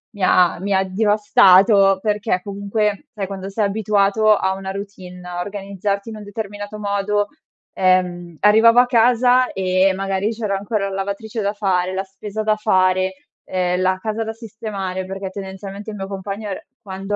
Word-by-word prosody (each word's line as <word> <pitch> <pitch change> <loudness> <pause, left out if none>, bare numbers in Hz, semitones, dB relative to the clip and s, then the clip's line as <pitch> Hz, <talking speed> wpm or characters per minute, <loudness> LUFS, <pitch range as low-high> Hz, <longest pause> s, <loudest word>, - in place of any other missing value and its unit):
mi 200 - -5
ha 180 -2 +4
mi 200 +2 -2
ha 190 0 +3
devastato, 195 -1 +4
perché 210 -3 0
comunque, 205 +3 -2
sai, 200 -4 -4
quando 195 0 -6
sei 205 +2 0
abituato 210 +1 +2
a 190 -1 0
una 190 0 -5
routine, 190 -2 -8
a 175 0 -4
organizzarti 200 +1 -4
in 220 - -7
un 210 - -9
determinato 205 0 -6
modo 205 0 0 0.5
ehm, 180 -2 +1
arrivavo 225 +3 +6
a 250 - +6
casa 245 +1 +4
e 185 0 +2
magari 195 +1 -1
c'era 215 -3 -2
ancora 200 0 -2
la 195 - -5
lavatrice 200 +3 -4
da 200 0 -1
fare, 185 -3 0
la 190 +1 -2
spesa 200 +2 -6
da 215 0 +2
fare, 185 -3 +2 0.3
ehm, 180 0 -1
la 185 0 +2
casa 220 +2 -3
da 220 0 -5
sistemare, 205 -4 -5
perché 195 0 -5
tendenzialmente 195 +1 -8
il 215 - -6
mio 195 -1 -5
compagno 200 +2 -5
è - - -2
r - - -7 0.2
quando 195 0 -4
200 Hz, 170 wpm, -20 LUFS, 190-210 Hz, 0.5 s, arrivavo